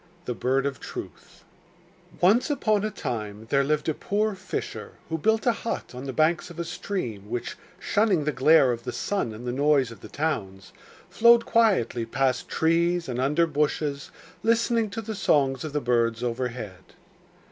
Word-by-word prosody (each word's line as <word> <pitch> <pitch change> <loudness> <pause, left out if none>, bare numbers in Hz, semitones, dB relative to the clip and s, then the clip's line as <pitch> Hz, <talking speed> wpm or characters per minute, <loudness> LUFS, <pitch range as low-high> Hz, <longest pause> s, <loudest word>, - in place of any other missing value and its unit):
] 175 0 -31
The 125 - -2
Bird 130 +3 0
of 140 -3 -2
Truth - - -9 0.8
Once 210 - +4
upon 215 -8 +1
a 215 - 0
time 110 - -5
there 140 0 +4
lived 150 +1 0
a 160 - +2
poor 210 +6 -1
fisher 190 - -6 0.2
who 160 - -1
built 220 +6 +2
a 240 - +5
hut 230 - -5
on 125 +2 -7
the 135 - -3
banks 155 +5 +1
of 170 - -11
a 170 - -3
stream 125 - -5
which, 120 +1 -4 0.2
shunning 205 -7 +1
the 150 - 0
glare 135 0 +5
of 115 -1 -3
the - - -5
sun 195 - -2
and 110 +3 -9
the 125 - -1
noise 140 -1 +2
of 115 - -11
the - - -10
towns, 100 -12 -3 0.4
flowed 235 0 +6
quietly 195 - +2
past 130 +1 0
trees 170 +2 +1
and 125 -1 -2
under 150 +6 +3
bushes, 150 -2 -1 0.3
listening 230 0 +2
to 225 +2 -5
the 220 +1 -4
songs 140 -10 +1
of 155 - -5
the 150 - 0
birds 115 -1 +1
overhead. 120 -5 -5
150 Hz, 180 wpm, -26 LUFS, 125-195 Hz, 0.8 s, flowed